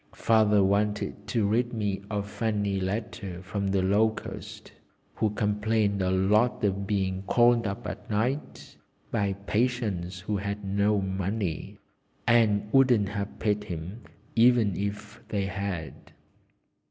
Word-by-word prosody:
Father 105 Hz, -3 st, +4 dB
wanted 105 Hz, +2 st, 0 dB
to 115 Hz, -4 st, +1 dB
read 120 Hz, +4 st, +1 dB
me 105 Hz, -3 st, -2 dB
a 105 Hz, -2 st, -1 dB
funny 105 Hz, -2 st, -1 dB
letter 95 Hz, -2 st, -4 dB
from 100 Hz, +2 st, -3 dB
the 95 Hz, -1 st, +1 dB
Locust, 105 Hz, +3 st, -1 dB, 0.4 s
who 110 Hz, -, +1 dB
complained 105 Hz, 0 st, 0 dB
a 90 Hz, -, +1 dB
lot 105 Hz, +7 st, +2 dB
of 100 Hz, -1 st, 0 dB
being 95 Hz, -2 st, 0 dB
called 120 Hz, -2 st, +4 dB
up 100 Hz, +5 st, -5 dB
at -, -, -7 dB
night 125 Hz, +8 st, -2 dB, 0.3 s
by 100 Hz, -1 st, +1 dB
patients 105 Hz, -7 st, -1 dB
who 105 Hz, +2 st, -2 dB
had 100 Hz, +1 st, -4 dB
no 100 Hz, +2 st, +2 dB
money, 95 Hz, -2 st, -3 dB, 0.5 s
and 105 Hz, -3 st, +3 dB
wouldn't 125 Hz, -7 st, +4 dB
have 100 Hz, 0 st, -4 dB
paid 105 Hz, -1 st, 0 dB
him 90 Hz, +7 st, -6 dB, 0.3 s
even 115 Hz, -4 st, +4 dB
if 100 Hz, +2 st, -5 dB
they 100 Hz, -2 st, -1 dB
had. 95 Hz, -3 st, -4 dB
105 Hz, 130 wpm, -27 LUFS, 95-110 Hz, 0.5 s, Father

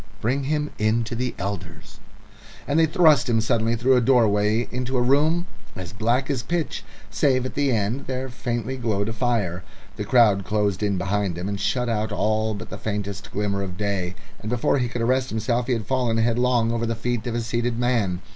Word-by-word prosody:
"Bring 130 Hz, +5 st, 0 dB
him 150 Hz, +1 st, -1 dB, 0.3 s
to 115 Hz, -, -6 dB
the 125 Hz, +1 st, -2 dB
elders." 90 Hz, -5 st, -6 dB, 0.7 s
And 145 Hz, +3 st, +2 dB
they 160 Hz, -, +5 dB
thrust 155 Hz, -6 st, +4 dB
him 115 Hz, -1 st, +3 dB
suddenly 115 Hz, 0 st, +1 dB
through 125 Hz, +3 st, +3 dB
a 125 Hz, -, +4 dB
doorway 110 Hz, -2 st, +3 dB
into 125 Hz, +1 st, -2 dB
a -, -, +2 dB
room 155 Hz, +7 st, +3 dB, 0.3 s
as 90 Hz, 0 st, -7 dB
black 120 Hz, +5 st, +1 dB
as 130 Hz, -4 st, -1 dB
pitch, 170 Hz, +4 st, -2 dB, 0.3 s
save 130 Hz, -4 st, +2 dB
at 130 Hz, -, -4 dB
the 140 Hz, -2 st, +1 dB
end 115 Hz, +4 st, -1 dB
there 130 Hz, 0 st, -3 dB
faintly 120 Hz, 0 st, -3 dB
glowed 110 Hz, -4 st, -1 dB
a -, -, -3 dB
fire. 105 Hz, -7 st, -1 dB, 0.3 s
The -, -, -2 dB
crowd 110 Hz, -6 st, +4 dB
closed 105 Hz, -1 st, 0 dB
in 100 Hz, -2 st, +1 dB
behind 95 Hz, -1 st, -1 dB
him 90 Hz, +2 st, -4 dB
and 100 Hz, -1 st, -3 dB
shut 125 Hz, +3 st, 0 dB
out 110 Hz, -1 st, -1 dB
all 110 Hz, +1 st, 0 dB
but 100 Hz, -, -8 dB
the 100 Hz, -, -6 dB
faintest 100 Hz, -1 st, -4 dB
glimmer 100 Hz, -1 st, -1 dB
of 90 Hz, -2 st, -5 dB
day, 95 Hz, -3 st, -2 dB, 0.2 s
and 110 Hz, -, -6 dB
before 125 Hz, +3 st, +1 dB
he 125 Hz, -, +1 dB
could 115 Hz, 0 st, -3 dB
arrest 130 Hz, +2 st, +1 dB
himself 115 Hz, +3 st, -1 dB
he 130 Hz, -, +2 dB
had 115 Hz, -3 st, -2 dB
fallen 120 Hz, -1 st, 0 dB
headlong 120 Hz, 0 st, +2 dB
over 115 Hz, 0 st, -1 dB
the 115 Hz, -, -1 dB
feet 120 Hz, +1 st, -2 dB
of 120 Hz, -, -2 dB
a 120 Hz, -, 0 dB
seated 120 Hz, +1 st, -1 dB
man. 115 Hz, -7 st, 0 dB
115 Hz, 205 wpm, -24 LUFS, 105-125 Hz, 0.7 s, they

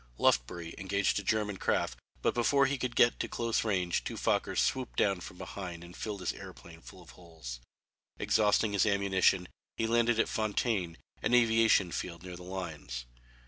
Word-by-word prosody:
Lufbery 80 Hz, +7 st, +1 dB
engaged 100 Hz, +1 st, +1 dB
a -, -, -7 dB
German 105 Hz, -1 st, 0 dB
craft -, -, 0 dB, 0.2 s
but -, -, +2 dB
before 140 Hz, +4 st, +3 dB
he 140 Hz, 0 st, -1 dB
could 125 Hz, -1 st, -3 dB
get 120 Hz, -1 st, +4 dB
to -, -, -1 dB
close 115 Hz, -1 st, -1 dB
range 90 Hz, -5 st, 0 dB
two -, -, -4 dB
Fokkers -, -, 0 dB
swooped 130 Hz, -1 st, 0 dB
down 100 Hz, -3 st, +2 dB
from 90 Hz, 0 st, -10 dB
behind 90 Hz, -2 st, -7 dB
and 85 Hz, +1 st, -12 dB
filled 105 Hz, -3 st, -5 dB
his 90 Hz, -, -1 dB
aeroplane 80 Hz, -1 st, -11 dB
full 95 Hz, +1 st, -13 dB
of 85 Hz, -, -15 dB
holes. 80 Hz, -9 st, -9 dB, 0.6 s
Exhausting 105 Hz, 0 st, +2 dB
his 100 Hz, +2 st, +3 dB
ammunition 95 Hz, -2 st, +2 dB, 0.3 s
he 115 Hz, -, 0 dB
landed 115 Hz, 0 st, +2 dB
at -, -, +3 dB
Fontaine, 105 Hz, -5 st, -1 dB, 0.2 s
an 125 Hz, -, +3 dB
aviation 115 Hz, -6 st, +4 dB
field 85 Hz, -1 st, -5 dB
near 90 Hz, -1 st, -7 dB
the 90 Hz, -, -11 dB
lines. 80 Hz, -10 st, -6 dB
95 Hz, 175 wpm, -31 LUFS, 85-110 Hz, 0.6 s, get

